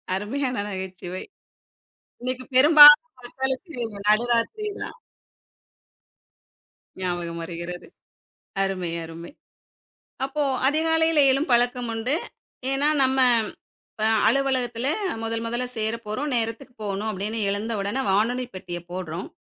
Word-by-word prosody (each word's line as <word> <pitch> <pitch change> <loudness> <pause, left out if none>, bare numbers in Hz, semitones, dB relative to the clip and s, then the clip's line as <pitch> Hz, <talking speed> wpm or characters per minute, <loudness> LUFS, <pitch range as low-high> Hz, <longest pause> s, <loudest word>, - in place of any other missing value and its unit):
அருமையான 250 +6 -2
நகைச்சுவை. 185 -1 -6 1.0
இன்னைக்கு 255 +1 -3
பெரும்பாலும் 295 +3 +9 0.2
மக்களுக்கு 265 +6 -4 0.3
நடுராத்திரி 240 - +1
தான். - - -7 2.0
ஞாபகம் 175 -2 -3
வருகிறது. 170 +1 -7 0.8
அருமை, 185 -3 -2
அருமை. 165 +1 -9 1.0
அப்போ 295 +2 -2 0.2
அதிகாலையில 320 +1 +2
எழும் 275 +3 0
பழக்கம் 245 0 +2
உண்டு. 230 +6 -1 0.6
ஏன்னா, 280 +2 +2
"நம்ம 265 0 +2 0.7
இப்ப 215 - -5 0.2
அலுவலகத்தில 260 -3 0 0.4
முதல் 225 0 -2
முதல்ல 240 +2 -2
சேரப் 220 +1 -3
போறோம். 255 +8 -2
நேரத்துக்கு 230 +3 -3
போகணும்." 205 +1 -2
அப்படீன்னு 210 +3 -4
எழுந்த 210 +3 -2
உடன, 230 +7 -2
வானொலி 240 +6 +1
பெட்டிய 180 -2 -6
போடுறோம். 180 -1 -5
230 Hz, 100 wpm, -24 LUFS, 195-265 Hz, 2.0 s, பெரும்பாலும்